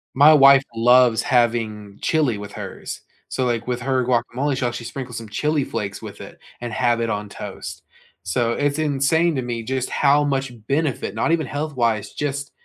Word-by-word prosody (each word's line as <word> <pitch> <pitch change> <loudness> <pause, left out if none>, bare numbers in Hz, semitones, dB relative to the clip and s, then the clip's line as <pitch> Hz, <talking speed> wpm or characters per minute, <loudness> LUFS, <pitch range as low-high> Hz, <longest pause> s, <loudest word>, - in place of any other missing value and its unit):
My 145 +3 +8
wife 140 -2 +7
loves 120 0 +5
having 110 -4 0
chili 145 -9 +1
with 100 0 -8
hers. - - -7 0.3
So, 130 - -1
like, 120 -2 -1
with 125 -1 -3
her 130 -1 0
guacamole, 125 +3 0
she'll 125 -2 -1
actually 120 -1 -7
sprinkle 125 0 -6
some 115 -1 -6
chili 150 +6 0
flakes 100 -5 -5
with - - -9
it - - -11 0.2
and 120 -1 -4
have 120 0 +1
it 115 - -1
on 105 -1 -3
toast. - - -8 0.4
So 120 -2 0
it's 145 +1 0
insane 155 +2 +1
to 130 - -1
me 120 -2 -4
just 130 +1 -2
how 145 +1 +3
much 135 -3 -1
benefit, 140 -8 -1
not 115 - 0
even 160 -4 +1
health-wise, 120 -8 -1
just 140 -1 -3
125 Hz, 180 wpm, -22 LUFS, 115-140 Hz, 0.4 s, My